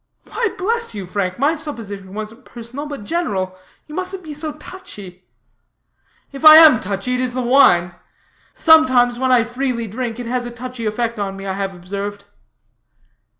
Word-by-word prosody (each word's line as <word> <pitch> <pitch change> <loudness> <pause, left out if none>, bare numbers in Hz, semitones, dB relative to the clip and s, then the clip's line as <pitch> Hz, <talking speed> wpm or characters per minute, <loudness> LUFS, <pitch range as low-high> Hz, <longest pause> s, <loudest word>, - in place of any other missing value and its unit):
"Why, 470 - -2
bless 460 - -2
you, 200 -2 -5
Frank, 185 0 -3
my 285 +5 +2
supposition 210 -11 -6
wasn't 215 +4 -7
personal, 245 +6 -8
but 285 -7 -7
general. 200 - -2 0.3
You 300 - -12
mustn't 370 +2 -4
be 310 -2 -7
so 300 +1 -5
touchy." 205 - -11 1.0
"If 275 +2 -10
I 310 0 +11
am 315 -7 +8
touchy 200 +5 -3
it 250 - -1
is 250 -1 -3
the 255 - -1
wine. 240 -9 +4 0.6
Sometimes, 255 -7 +4
when 260 0 +1
I 245 -2 +5
freely 245 0 -3
drink, 230 +2 -5
it 245 - -5
has 245 +1 -2
a - - -5
touchy 240 -1 -6
effect 230 +1 -2
on 195 -1 -3
me, 195 - -8
I 190 - -2
have 195 -1 -4
observed." 200 +3 -6
240 Hz, 170 wpm, -19 LUFS, 200-285 Hz, 1.0 s, I